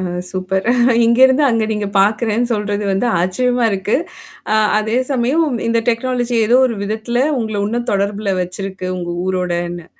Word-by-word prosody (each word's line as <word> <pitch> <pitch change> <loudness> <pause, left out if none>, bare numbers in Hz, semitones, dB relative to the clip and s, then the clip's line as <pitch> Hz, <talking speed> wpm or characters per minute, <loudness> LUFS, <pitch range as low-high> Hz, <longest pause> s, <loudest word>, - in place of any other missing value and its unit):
அ - - -3 0.3
super 190 +1 -2 0.4
இங்கருந்து 260 +4 +4
அங்க 230 -3 +1
நீங்க 210 -1 -2
பார்க்கறேன்னு 220 +3 +1
சொல்றது 205 -1 -2
வந்து 195 +5 0
ஆச்சரியமா 245 +7 0
இருக்கு. 195 +4 0 0.6
அ - - +3 0.2
அதே 220 +2 -1
சமயம் 270 +5 +1 0.2
இந்த 230 0 +2
டெக்னாலஜி 245 0 0
ஏதோ 240 - +4
ஒரு 230 -3 -4
விதத்தில 220 +4 -1 0.2
உங்கள 220 -3 -3
இன்னும் 240 +3 -3
தொடர்புல 200 0 -1
வச்சிருக்கு 185 +1 -4
உங்க 175 -1 -5
ஊரோடன்னு. 175 -2 -3
215 Hz, 145 wpm, -17 LUFS, 190-240 Hz, 0.6 s, இங்கருந்து